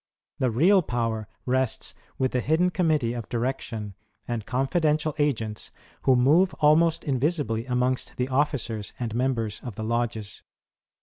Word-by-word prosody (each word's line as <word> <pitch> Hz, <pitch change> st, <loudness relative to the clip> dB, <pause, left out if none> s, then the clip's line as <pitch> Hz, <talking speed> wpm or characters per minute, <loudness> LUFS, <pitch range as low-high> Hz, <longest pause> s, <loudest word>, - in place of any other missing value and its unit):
The 130 Hz, -, +2 dB
real 175 Hz, -, +4 dB
power 115 Hz, -6 st, -2 dB, 0.2 s
rests 130 Hz, -1 st, 0 dB, 0.2 s
with 130 Hz, -1 st, +1 dB
the 125 Hz, -, +1 dB
hidden 160 Hz, +7 st, +2 dB
committee 155 Hz, -10 st, +1 dB
of 120 Hz, -3 st, -6 dB
direction, 115 Hz, -4 st, -3 dB, 0.3 s
and 115 Hz, -3 st, -3 dB
confi 135 Hz, +7 st, 0 dB
dential 155 Hz, 0 st, +1 dB
agents, 115 Hz, -7 st, -1 dB, 0.4 s
who 130 Hz, -, +5 dB
move 155 Hz, +10 st, +4 dB
almost 155 Hz, +2 st, +4 dB
invisibly 135 Hz, -4 st, 0 dB
amongst 125 Hz, 0 st, 0 dB
the 125 Hz, -, 0 dB
officers 130 Hz, -6 st, -1 dB
and 115 Hz, -3 st, -3 dB
members 115 Hz, -4 st, -1 dB
of 120 Hz, -5 st, -6 dB
the 110 Hz, -, -5 dB
lodges. 110 Hz, -2 st, -2 dB
125 Hz, 140 wpm, -26 LUFS, 115-150 Hz, 0.4 s, who